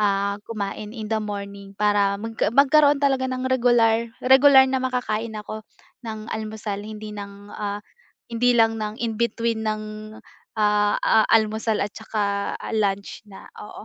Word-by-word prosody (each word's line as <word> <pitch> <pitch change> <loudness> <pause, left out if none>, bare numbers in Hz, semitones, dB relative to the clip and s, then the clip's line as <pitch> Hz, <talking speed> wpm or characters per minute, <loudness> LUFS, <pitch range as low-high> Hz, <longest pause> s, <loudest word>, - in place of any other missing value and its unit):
ah, 200 0 0
kumain 215 +1 -5
in 220 0 -5
the 220 - +1
morning 200 -1 -7
para 205 -1 +2
magka 225 +1 -2
magkaroon 285 +4 +5
talaga 265 -1 +1
ng 255 0 -3
regular 235 -2 +3 0.2
regular 265 +1 +7
na 265 0 -1
makakain 230 -4 -2
ako 215 +1 -6 0.5
ng 215 -1 -6
almusal, 215 -2 -5
hindi 215 0 -8
ng, 200 0 -10
ah, 205 0 -5 0.5
hindi 245 +1 +2
lang 225 -1 +3
ng 210 +1 -4
in 230 -2 -1
between 230 -1 0
ng, 215 0 -1 0.8
ah, 210 -1 +2
a 220 -1 +3
almusal 220 0 +2
at 205 - -4
tsaka 205 -2 -2 0.2
lunch 200 -2 -1
na, 195 - -12 0.2
oo. 210 - -10
215 Hz, 145 wpm, -23 LUFS, 205-235 Hz, 0.8 s, regular